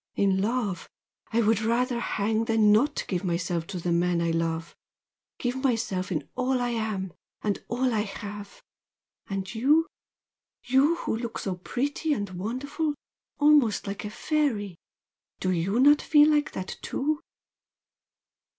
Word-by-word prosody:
In 195 -1 +2
love 210 -4 -1 0.4
I 235 +1 +2
would 220 0 +3
rather 235 +2 +1
hang 220 0 0
than 220 -2 +4
not 280 +8 +2
give 180 -2 -2
myself 170 -2 -1
to 190 -3 -5
the 175 +1 -2
man 175 0 +2
I 170 0 +1
love 165 0 -2 0.6
give 250 +1 -2
myself 225 -8 -1
in 155 - -2
all 255 0 0
I 245 0 0
am, 215 -6 -2 0.3
and 205 -2 -1
all 250 +1 0
I 215 - +1
have! 205 0 -7 0.6
And 195 0 -4
YOU 290 +8 +4 0.8
you 270 +6 +3
who 340 - -2
look 230 0 -4
so 195 - -2
pretty 280 - -2
and 205 -7 -3
wonderful 270 - -3 0.4
almost 290 -7 +4
like 200 +1 -5
a 210 - -4
fairy! 220 - -1 0.6
do 185 - 0
YOU 185 +6 0
not 290 +3 +6
feel 300 0 +5
like 295 -1 +1
that 185 0 -5
too?" 300 +3 -1
220 Hz, 145 wpm, -27 LUFS, 190-260 Hz, 0.8 s, not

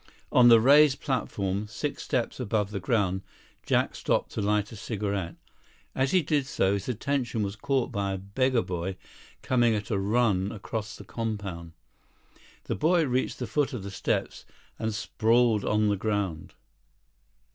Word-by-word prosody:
On 125 -1 +6
the 115 -1 +8
raised 140 +3 +6
platform, 105 -6 -2
six - - -4
steps - - -2
above 105 -1 -1
the 100 - -3
ground, 95 -2 0 0.4
Jack - - +1
stopped - - 0
to - - -3
light 105 0 0
a - - -8
cigarette. 100 -5 -3 0.6
As 135 0 +1
he 185 +1 +3
did 145 -2 0
so, 95 -7 +1
his 100 +3 -3
attention 125 -2 -1
was 100 0 -3
caught 135 +1 -1
by 100 -1 -1
a - - -2
beggar 115 +6 0
boy 90 +1 -4 0.5
coming 120 -3 +3
at 105 +2 -4
a 100 - +1
run 100 -2 +1
across 105 0 -5
the - - -11
compound. 100 -7 -5 0.9
The - - -3
boy 165 - +2
reached 130 -1 -1
the 125 - -3
foot 135 +6 0
of 115 -6 -5
the 100 - -6
steps 95 - -2 0.4
and 110 - -1
sprawled 110 +1 +2
on 105 0 +2
the 100 - +1
ground. 100 -6 -2
110 Hz, 160 wpm, -27 LUFS, 100-125 Hz, 0.9 s, the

